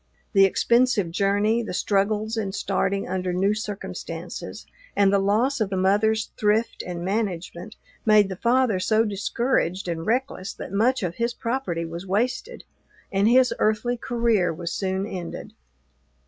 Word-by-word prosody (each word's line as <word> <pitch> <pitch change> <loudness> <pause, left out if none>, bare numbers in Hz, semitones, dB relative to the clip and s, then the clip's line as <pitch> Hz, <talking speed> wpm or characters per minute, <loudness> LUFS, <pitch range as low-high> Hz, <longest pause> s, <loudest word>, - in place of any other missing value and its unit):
The 195 -1 +7
expensive 235 -2 +2
journey, 205 +5 +2
the 215 -5 -5
struggles 210 +3 0
in 200 -4 -2
starting 195 0 -1
under 185 0 -2
new 190 +3 +2
circumstances, 210 -2 -6 0.3
and 200 -1 +4
the 200 - +4
loss 225 +7 +1
of 210 - +1
the 190 - -2
mother's 210 +4 +2
thrift 215 +2 +1
and 175 -1 -5
management, 190 -1 -3 0.3
made 215 -2 +5
the 190 - -5
father 235 -1 +2
so 220 +4 +2
discouraged 200 -2 -1
and 165 -1 -3
reckless 230 -3 -1
that - - -8
much 240 +4 +2
of 175 -2 -3
his 235 +1 -1
property 230 -9 -2
was 170 +3 -7
wasted, 245 - -1 0.5
and 200 +1 +2
his 255 +1 +5
earthly 220 +3 +1
career 230 -6 +1
was 170 +1 -5
soon 190 0 -1
ended. 185 -5 -7
205 Hz, 145 wpm, -24 LUFS, 190-230 Hz, 0.5 s, The